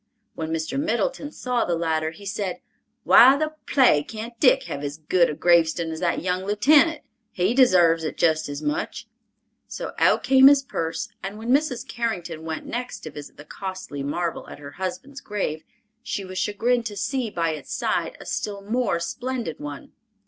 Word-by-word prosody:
When 160 0 -5
Mr. 160 +10 -2
Middleton 310 - -1
saw 250 -5 -1
the 175 - 0
latter, 160 -1 0
he 185 +5 -13
said, 195 -2 -3 0.4
"Why 265 +3 +8
the 310 +1 -2
plague 245 - +4
can't 225 +2 -7
Dick 265 0 +5
have 145 - -6
as 145 +1 -4
good 170 +3 +2
a 150 - -3
gravestun 170 -1 +3
as 160 - -5
that 175 -1 -1
young 180 0 -1
lieutenant? 290 +10 +4 0.3
He 185 +5 +1
desarves 175 -11 +5
it 155 - -4
jest 155 -2 +2
as 145 - -6
much"; 295 +3 -3 0.6
so - - -6
out - - +4
came 265 0 +7
his 280 -1 +6
purse, 165 -11 -3
and 195 +2 -6
when 225 +2 -6
Mrs. 280 -3 +1
Carrington 175 -9 -3
went 160 -1 -5
next 245 +1 -5
to 155 - -8
visit 145 0 -10
the 150 - -12
costly 185 -5 -6
marble 165 +4 -3
at - - -9
her 140 0 -10
husband's 190 - -6
grave, 185 -7 -3 0.4
she 200 - -4
was 185 0 -5
chagrined 230 +3 0
to 205 - -7
see 230 +4 -1
by 165 -4 -1
its 155 - -8
side - - -1
a - - -11
still 200 -1 -4
more 215 -4 0
splendid 240 +1 -4
one. 145 -1 -8
190 Hz, 180 wpm, -24 LUFS, 160-250 Hz, 0.6 s, Why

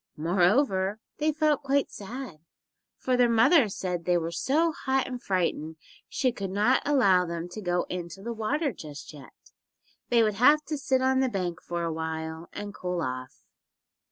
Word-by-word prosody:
Moreover, 190 - +2 0.2
they 305 +1 +2
felt 305 -2 +1
quite 275 0 0
sad, 210 - -8 0.6
for 255 - 0
their 245 -1 +4
mother 235 +3 +5
said 180 -3 -3
they 180 -1 +3
were 165 0 -2
so 305 - +1
hot 265 -3 -1
and 250 -1 -6
frightened 165 -4 -1 0.3
she 255 -2 +1
could 200 -5 -5
not 210 +7 +2
allow 200 -11 +4
them 170 -1 -4
to 215 +4 -7
go 175 -2 0
into 180 +1 -6
the 235 +1 -3
water 270 +6 -1
just 150 -3 -10
yet. 140 -3 -15 0.6
They 235 -2 +4
would 215 -1 +1
have 290 +8 +5
to 305 - -1
sit 260 -2 +1
on 260 0 +3
the 265 -1 +2
bank 180 -6 -3
for 170 0 -4
a 165 -1 -1
while 160 +1 -5
and 205 0 -6
cool 180 -2 -3
off. 130 -3 -5
200 Hz, 175 wpm, -27 LUFS, 175-260 Hz, 0.6 s, mother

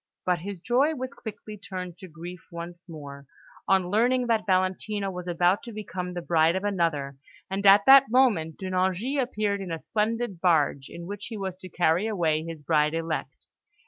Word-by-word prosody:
But 180 -1 +1
his 190 +1 -7
joy 270 - +2
was 260 0 -5
quickly 215 -1 -9
turned 185 -3 -7
to 190 - -9
grief 170 +2 -10
once 170 +1 -9
more, 140 -3 -9 0.4
on 185 -1 +2
learning 245 +4 +2
that 225 -2 0
Valentina 190 +2 0
was 180 -1 -7
about 175 +3 +2
to 235 - -9
become 185 -4 -5
the 175 - -4
bride 165 0 +3
of 190 - -2
another; 165 -9 -1 0.3
and 195 +1 -2
at 200 +1 +7
that 270 -1 +8
moment, 220 -11 +2
De 190 -1 -5
Nevers 185 +1 +1 0.2
appeared 210 -5 -1
in 185 -3 -6
a 165 - -2
splendid 215 0 -2
barge, 150 -6 +2
in 170 - -9
which 200 +2 -6
he 225 - -6
was 190 -2 -4
to 185 -1 -11
carry 175 +4 +2
away 165 -7 +1
his 165 -2 -8
bride 150 0 +2
elect. 165 -1 -4
185 Hz, 185 wpm, -26 LUFS, 170-210 Hz, 0.4 s, that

